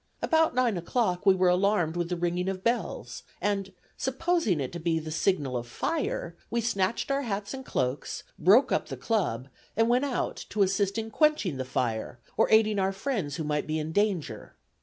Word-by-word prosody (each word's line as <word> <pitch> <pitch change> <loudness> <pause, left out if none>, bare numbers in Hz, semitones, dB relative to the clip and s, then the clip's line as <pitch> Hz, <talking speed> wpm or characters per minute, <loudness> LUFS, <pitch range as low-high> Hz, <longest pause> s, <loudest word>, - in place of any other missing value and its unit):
About 320 -4 +3
nine 245 -6 +2
o'clock 180 +1 -1
we 190 - +7
were 185 0 +3
alarmed 180 -2 +2
with 175 -1 -1
the 180 - 0
ringing 175 +2 -1
of 190 -1 -4
bells, 235 +1 -2 0.2
and, 200 -1 -1 0.3
supposing 265 - +1
it 130 -2 -3
to 170 - -6
be 165 0 0
the 155 0 -5
signal 155 -5 0
of 120 0 -3
fire, 415 - -2
we 235 - 0
snatched 225 +1 0
our 275 0 +1
hats 205 -4 -3
and 265 0 -6
cloaks, 130 - -2 0.2
broke 205 - +5
up - - +1
the - - -6
club, 155 - -1 0.3
and 225 +1 +3
went 250 +3 +3
out 270 -3 -2
to 205 -1 +2
assist 195 +1 0
in 225 0 -3
quenching 300 - +2
the 130 - -3
fire, 120 -2 -2 0.2
or - - +3
aiding 215 -2 +4
our 190 0 +2
friends 195 - -2
who 160 - -3
might 150 0 -1
be 155 0 -1
in 155 0 -3
danger. 175 - -1
195 Hz, 195 wpm, -28 LUFS, 160-235 Hz, 0.3 s, we